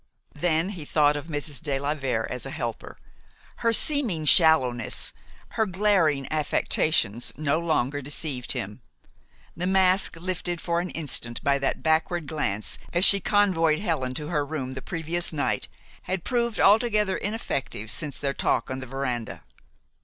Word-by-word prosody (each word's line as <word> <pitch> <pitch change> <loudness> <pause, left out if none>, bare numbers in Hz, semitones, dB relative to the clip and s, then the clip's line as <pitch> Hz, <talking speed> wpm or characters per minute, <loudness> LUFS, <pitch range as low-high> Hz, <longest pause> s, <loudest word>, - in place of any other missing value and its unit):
Then 165 +3 0
he 180 -6 -6
thought 145 0 +2
of 145 +2 -6
Mrs. 145 -2 -4
de 145 -4 -1
la 140 +2 -1
Vere 130 -7 -2
as 125 -2 -5
a - - -6
helper. 120 -6 -6 0.6
Her 230 - +1
seeming 230 - +1
shallowness, 135 -8 +3 0.4
her 220 - -1
glaring 180 -8 +1
affectations, 150 -6 +1
no 155 +1 0
longer 145 -4 -1
deceived 140 -2 -2
him. 105 +6 -5 0.7
The 180 +2 -2
mask 190 -1 +2
lifted 175 0 -3
for 170 0 -1
an 180 +1 -3
instant 125 -7 -3
by 140 0 +2
that 135 - -2
backward 160 +1 +1
glance 110 -10 -3
as 175 +3 +6
she 200 - +10
convoyed 180 -6 +2
Helen 135 -10 -2
to 150 +1 -5
her 150 -4 0
room 140 -3 -5
the 130 - -7
previous 170 +1 -3
night 150 -3 -1 0.3
had 185 -1 -4
proved 235 -3 -1
altogether 210 -2 +3
ineffective 140 - -3
since 150 -3 -3
their 140 -1 -2
talk 130 - -1
on 130 - -3
the 130 - -8
veranda. 125 -3 -4
155 Hz, 155 wpm, -25 LUFS, 135-180 Hz, 0.7 s, she